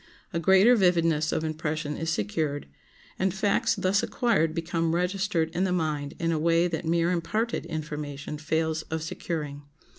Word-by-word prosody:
A 170 Hz, -, 0 dB
greater 190 Hz, +8 st, +6 dB
vividness 165 Hz, -6 st, +3 dB
of 160 Hz, -, -1 dB
impression 155 Hz, -1 st, -2 dB
is 165 Hz, -, -3 dB
secured, 145 Hz, +4 st, -1 dB, 0.5 s
and 190 Hz, 0 st, +2 dB
facts 200 Hz, +2 st, +1 dB
thus 190 Hz, +2 st, +2 dB
acquired 165 Hz, -10 st, +1 dB
become 165 Hz, 0 st, 0 dB
registered 180 Hz, -2 st, 0 dB
in 180 Hz, -, +1 dB
the 190 Hz, -, +1 dB
mind 155 Hz, -4 st, -1 dB
in 165 Hz, 0 st, 0 dB
a 160 Hz, -, 0 dB
way 170 Hz, +2 st, +3 dB
that 165 Hz, -1 st, -3 dB
mere 170 Hz, +1 st, +2 dB
imparted 200 Hz, +3 st, -1 dB
information 150 Hz, -2 st, -5 dB
fails 160 Hz, 0 st, 0 dB
of 160 Hz, 0 st, -2 dB
securing. 150 Hz, -3 st, -4 dB
165 Hz, 155 wpm, -27 LUFS, 155-180 Hz, 0.5 s, greater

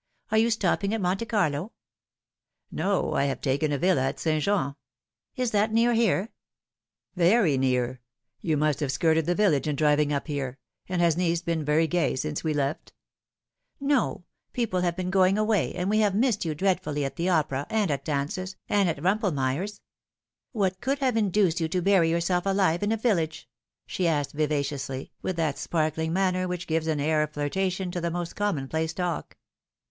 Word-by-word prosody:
Are 220 Hz, -, +3 dB
you 230 Hz, +1 st, +3 dB
stopping 205 Hz, -1 st, +1 dB
at 225 Hz, -, -3 dB
Monte 190 Hz, +5 st, 0 dB
Carlo 185 Hz, -4 st, 0 dB, 0.4 s
?" -, -, -67 dB
" -, -, -54 dB
No, 190 Hz, +4 st, 0 dB
I 140 Hz, -, +2 dB
have 135 Hz, -2 st, -2 dB
taken 140 Hz, +2 st, 0 dB
a 145 Hz, -, +1 dB
villa 180 Hz, -1 st, +2 dB
at 135 Hz, +1 st, -2 dB
St. 155 Hz, -2 st, 0 dB
Jean." 190 Hz, -9 st, +1 dB, 0.3 s
" -, -, -60 dB
Is 250 Hz, -3 st, -1 dB
that 210 Hz, +1 st, +2 dB
near 230 Hz, +2 st, +3 dB
here 225 Hz, -2 st, +2 dB, 0.3 s
?" -, -, -67 dB
" -, -, -67 dB
Very 180 Hz, -2 st, +4 dB
near. 125 Hz, -1 st, 0 dB, 0.4 s
You 160 Hz, -3 st, 0 dB
must 150 Hz, -1 st, +1 dB
have 145 Hz, -3 st, -1 dB
skirted 160 Hz, +2 st, +2 dB
the 175 Hz, -, +2 dB
village 165 Hz, -10 st, +2 dB
in 150 Hz, -, 0 dB
driving 150 Hz, 0 st, +3 dB
np 145 Hz, -1 st, -1 dB
here. 140 Hz, -4 st, -4 dB, 0.3 s
And 180 Hz, -1 st, +1 dB
has 170 Hz, -2 st, +3 dB
Nice 170 Hz, -1 st, 0 dB
been 165 Hz, -2 st, -1 dB
very 150 Hz, +2 st, +3 dB
gay 165 Hz, -4 st, 0 dB
since 150 Hz, +3 st, -3 dB
we 160 Hz, -, 0 dB
left 145 Hz, 0 st, -2 dB, 0.3 s
?" -, -, -67 dB
" -, -, -52 dB, 0.2 s
No; 235 Hz, -7 st, -1 dB, 0.3 s
people 225 Hz, -7 st, 0 dB
have 175 Hz, -1 st, 0 dB
been 185 Hz, 0 st, -3 dB
going 190 Hz, +1 st, +4 dB
away, 215 Hz, -1 st, +1 dB
and 180 Hz, 0 st, -2 dB
we 215 Hz, +2 st, +2 dB
have 205 Hz, -3 st, +2 dB
missed 225 Hz, -4 st, +1 dB
you 155 Hz, -2 st, -2 dB
dreadfully 175 Hz, -5 st, 0 dB
at 135 Hz, -, -4 dB
the 175 Hz, +2 st, -1 dB
opera, 145 Hz, -5 st, 0 dB
and 210 Hz, -6 st, +1 dB
at 140 Hz, -1 st, -2 dB
dances, 155 Hz, +7 st, -3 dB
and 200 Hz, -3 st, +2 dB
at 160 Hz, -, -2 dB
Bumpelmeyer's. 185 Hz, -1 st, 0 dB, 0.7 s
What 190 Hz, -5 st, -1 dB
could 270 Hz, +3 st, 0 dB
have 260 Hz, -4 st, 0 dB
induced 200 Hz, -5 st, +2 dB
you 160 Hz, -, +1 dB
to 180 Hz, +3 st, -1 dB
bury 180 Hz, -2 st, +3 dB
yourself 175 Hz, +2 st, 0 dB
alive 190 Hz, -4 st, +2 dB
in 205 Hz, +1 st, 0 dB
a 225 Hz, -, +1 dB
vil 225 Hz, -3 st, +2 dB
lage 160 Hz, -1 st, -4 dB, 0.2 s
?" -, -, -66 dB
she 180 Hz, -, -1 dB
asked 145 Hz, -4 st, 0 dB
vivaciously, 140 Hz, -3 st, -2 dB
with 185 Hz, -, -2 dB
that 160 Hz, -4 st, -1 dB
sparkling 160 Hz, 0 st, -1 dB
manner 185 Hz, 0 st, +1 dB
which 180 Hz, -1 st, -4 dB
gives 160 Hz, 0 st, -1 dB
an 155 Hz, -2 st, 0 dB
air 155 Hz, +1 st, +2 dB
of 150 Hz, 0 st, -2 dB
flirtation 185 Hz, +5 st, -1 dB
to 175 Hz, -, -3 dB
the 170 Hz, -, -1 dB
most 175 Hz, 0 st, -4 dB
commonplace 160 Hz, -4 st, -1 dB
talk. 175 Hz, -4 st, -3 dB
170 Hz, 200 wpm, -26 LUFS, 150-195 Hz, 0.7 s, Very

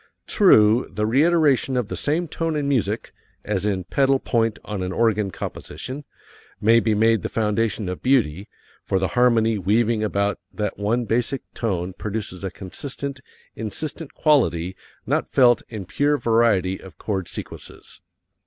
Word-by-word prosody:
True, 115 Hz, -, +5 dB
the 105 Hz, +2 st, -1 dB
reiteration 140 Hz, 0 st, +3 dB
of 120 Hz, -4 st, 0 dB
the -, -, -5 dB
same 165 Hz, +4 st, -1 dB
tone 165 Hz, +1 st, -2 dB
in 145 Hz, -2 st, -1 dB
music 110 Hz, -6 st, -1 dB, 0.3 s
as 105 Hz, -1 st, -1 dB
in 95 Hz, -3 st, -1 dB
pedal 135 Hz, +8 st, +2 dB
point 115 Hz, -4 st, 0 dB
on 105 Hz, -3 st, -4 dB
an 90 Hz, 0 st, -2 dB
organ 105 Hz, -1 st, +1 dB
composition 130 Hz, -, -7 dB, 0.5 s
may 115 Hz, +2 st, +5 dB
be 110 Hz, -2 st, +1 dB
made 110 Hz, 0 st, +3 dB
the -, -, -3 dB
foundation 110 Hz, -1 st, 0 dB
of 90 Hz, 0 st, -5 dB
beauty, 105 Hz, -, +1 dB, 0.3 s
for 95 Hz, -, 0 dB
the 95 Hz, -1 st, 0 dB
harmony 115 Hz, -1 st, +3 dB
weaving 110 Hz, +3 st, +1 dB
about 100 Hz, -1 st, 0 dB
that 105 Hz, -2 st, -3 dB
one 115 Hz, +4 st, 0 dB
basic 120 Hz, +5 st, -1 dB
tone 95 Hz, -5 st, -2 dB
produces 100 Hz, -2 st, -5 dB
a 95 Hz, -, -2 dB
consistent, 135 Hz, +9 st, -6 dB, 0.4 s
insistent 140 Hz, +7 st, -5 dB
quality 95 Hz, -, +2 dB, 0.3 s
not -, -, 0 dB
felt 120 Hz, -2 st, +5 dB
in 105 Hz, -4 st, -6 dB
pure 145 Hz, +11 st, +1 dB
variety 110 Hz, -7 st, +2 dB
of 95 Hz, -, -13 dB
chord 95 Hz, -5 st, -3 dB
sequences. -, -, -9 dB
110 Hz, 150 wpm, -23 LUFS, 100-130 Hz, 0.5 s, True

